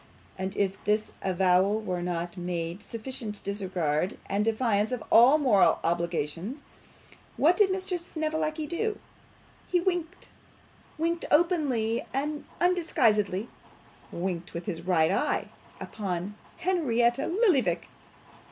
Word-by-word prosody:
And 190 0 -4
as - - -11
if 195 -1 -1
this 210 +1 0
avowal 190 +2 +3
were 185 -5 -3
not 175 0 -3
made 175 -1 -3
in - - -22
sufficient 225 -1 -7
disregard 185 -5 -1
and 200 +1 0
defiance 220 -1 +1
of 250 -3 -3
all 250 +6 +8
moral 250 -10 +4
obligations, 170 - -2 0.7
what 330 +5 +5
did 410 -1 +4
Mr. 375 -1 -2
Snevellicci 315 -2 -2
do? 420 +7 -2 0.7
He 360 - +2
winked 355 -1 -2 0.7
winked 335 +2 -1
openly 290 -9 +2
and 295 +2 -2
undisguisedly; 230 - +2 0.6
winked 175 -1 -4
with 170 - -5
his 185 -6 -4
right 170 -3 +2
eye - - 0 0.3
upon 195 -2 -4 0.2
Henrietta 270 -10 +1
Lillyvick! 305 - +2
220 Hz, 115 wpm, -28 LUFS, -, 0.7 s, all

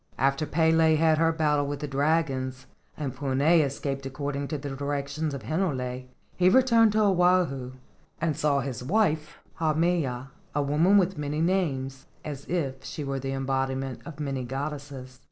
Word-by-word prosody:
After 140 +4 +1
Pele 160 0 +4
had 155 0 +3
her 165 0 +4
battle 150 -3 +1
with 145 0 -3
the 150 - -4
dragons, 135 -3 0 0.3
and 140 -4 -4
Puna 135 0 -1
had 165 0 +6
escaped 140 -1 -2
according 140 +1 -3
to 150 - -3
the 140 0 -6
directions 140 +2 -2
of 130 - -7
Hinole, 130 - -2 0.3
he 180 0 +4
returned 230 -1 +5
to 215 - +3
Oahu 180 -9 +2 0.5
and 160 -2 0
saw 140 -1 +1
his 125 -2 -5
wife, 160 -2 +1 0.2
Haumea, 155 -5 0 0.2
a 145 - +2
woman 160 +8 +4
with 190 -3 +1
many 150 +1 -2
names, 140 -7 -1 0.2
as 145 -2 -6
if 135 -6 -2
she 150 - -5
were 135 -1 -2
the 135 +1 -3
embodiment 135 -1 -2
of 155 -3 -10
many 135 -3 -2
goddesses. 135 -1 -6
145 Hz, 160 wpm, -27 LUFS, 135-160 Hz, 0.5 s, had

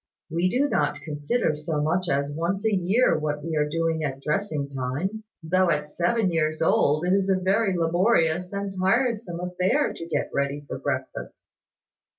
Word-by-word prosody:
We 170 +3 +1
do 265 +8 +2
not 150 - 0
consider 155 +6 -1
so 150 0 -3
much 170 +4 0
as 140 +1 0
once 185 +6 -2
a 220 - +2
year 195 +2 +3
what 150 -1 -2
we 165 0 -3
are 150 -1 +1
doing 165 0 0
at 135 -2 -3
dressing 150 -1 -1
time, 140 +11 -3 0.2
though 185 +3 +2
at 150 -2 0
seven 185 +5 +1
years 155 -1 0
old 155 0 +2
it 180 - +2
is 195 0 +2
a 190 - +4
very 190 +1 +1
laborious 175 0 +2
and 200 -1 -3
tiresome 220 -3 +1
affair 180 +10 0
to 165 - -8
get - - -2
ready 140 +1 -1
for - - -5
breakfast." 130 -2 -4
170 Hz, 170 wpm, -25 LUFS, 150-195 Hz, 0.2 s, a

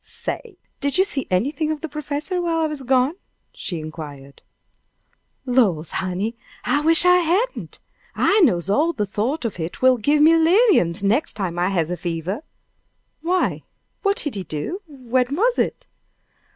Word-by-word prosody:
"Say! - - -7 0.2
did 280 +4 0
you 380 - +6
see 290 -9 -2
anything 285 - 0
of 305 -2 -4
the 320 - -3
professor 300 +4 -3
while 335 -1 0
I - - +2
was 305 -3 -2
gone?" 260 +5 +2 0.4
she 175 -4 -5
inquired. 145 -3 -9 1.0
"Lors, 200 - +2
honey, 190 +5 -2 0.3
I 290 - +2
wish 330 +3 +4
I 360 0 +7
hadn't! 365 +9 -1 0.4
I 415 - +3
knows 185 - +3
how 305 +12 +2
de 210 - -1
thought 240 +9 -2
of 210 -5 -4
it 165 +8 -5
will 260 -1 +6
give 295 +7 +3
me 320 +2 +7
'liriums 325 - +4
nex' 220 +10 +1
time 180 -4 -3
I 180 +2 +2
has 175 -4 0
a 180 - -2
fever." 175 - -3 0.8
"Why? 360 +3 0 0.4
What 400 0 +1
did 295 - -1
he 195 -2 -4
do? 165 - -5
When 255 -2 -1
was 475 +8 +2
it?" - - -1
260 Hz, 165 wpm, -22 LUFS, -, 1.0 s, I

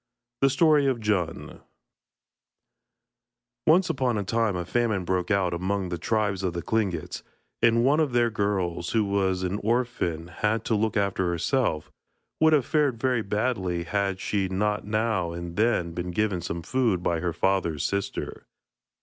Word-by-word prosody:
THE 135 - +5
STORY 150 0 +4
OF 130 -2 +1
DJUN 100 -6 -2 2.1
Once 180 +4 +5
upon 130 - 0
a 100 - -1
time 110 0 0
a 90 -1 -3
famine 110 -3 0
broke 90 0 -1
out 95 -4 +1
among 95 +2 -2
the 85 -1 -4
tribe 105 0 0
of 90 -3 -1
the 85 - -4
Tlingits, 100 -8 -2 0.4
and 115 0 +4
one 145 +4 +4
of 155 -4 +1
their 120 -1 +2
girls, 95 -5 -1
who 110 -2 +2
was 95 -2 0
an 95 +3 -2
orphan 120 0 0
and 85 +2 -11
had 105 +5 -1
to - - 0
look 110 +1 +1
after 100 -2 0
herself, 85 - 0 0.5
would 160 0 +5
have 140 -5 +3
fared 145 -7 +1
very 125 -1 +1
badly 100 -5 -1
had 100 0 -1
she 100 -1 -1
not 105 +2 -1
now 105 -5 0
and 85 0 -6
then 105 -6 +1
been 90 +1 -4
given 95 0 0
some 85 0 -4
food 115 -8 0
by 85 -2 0
her 85 +1 -1
father's 85 -3 0
sister. 100 0 -3
100 Hz, 165 wpm, -26 LUFS, 90-115 Hz, 2.1 s, THE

